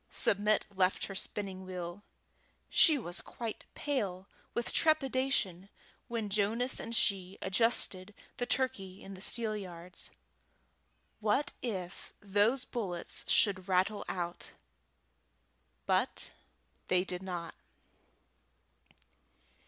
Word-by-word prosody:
Submit 210 +1 +4
left 185 0 +2
her 195 - -6
spinning 190 -1 -2
wheel. 180 0 -6 0.7
She 315 -4 +7
was 175 -8 -2
quite 230 -3 -6
pale 200 -10 -2 0.3
with 235 - -1
trepidation 260 - +2 0.4
when 230 -3 -2
Jonas 215 +5 +2
and 230 - -4
she 195 -3 +1
adjusted 195 -1 +1 0.2
the 245 - -2
turkey 200 -8 -1
in 195 - -8
the 185 - -10
steelyards. 195 -6 -3 1.1
What 220 +7 +1
if 190 -7 -5
those 210 +6 +2
bullets 185 -8 -3
should 195 -3 +4
rattle 190 +3 +2
out? 175 -1 -4 1.3
But - - +1 0.6
they 180 0 +3
did 180 -1 -5
not. 175 -3 -5
200 Hz, 100 wpm, -33 LUFS, 185-230 Hz, 1.3 s, She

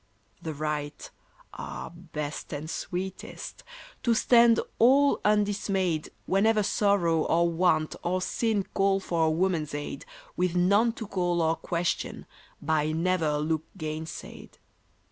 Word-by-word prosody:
The 160 -2 -5
right 150 0 -4 0.4
ah, - - -7
best 155 -4 -6
and 150 +2 -5
sweetest! 180 +3 -6 0.4
To 235 -2 +2
stand 235 0 +5 0.2
all 275 +5 +5
undismayed 200 -5 +1 0.2
Whenever 210 +2 +3
sorrow 195 -6 +2
or 170 +1 +3
want 165 -2 +1
or 180 +2 0
sin 215 +2 0
Call 195 0 +2
for 170 -4 0
a - - +3
woman's 160 -3 0
aid, 145 -1 -6 0.3
With 180 -1 0
none 200 +6 +3
to 225 - -6
call 175 -3 0
or 160 0 +2
question, 170 +1 -2 0.3
by 155 0 0
never 170 0 +1
a 150 0 +1
look 155 +1 -1
gainsaid. 155 -1 -7
175 Hz, 125 wpm, -27 LUFS, 155-200 Hz, 0.4 s, stand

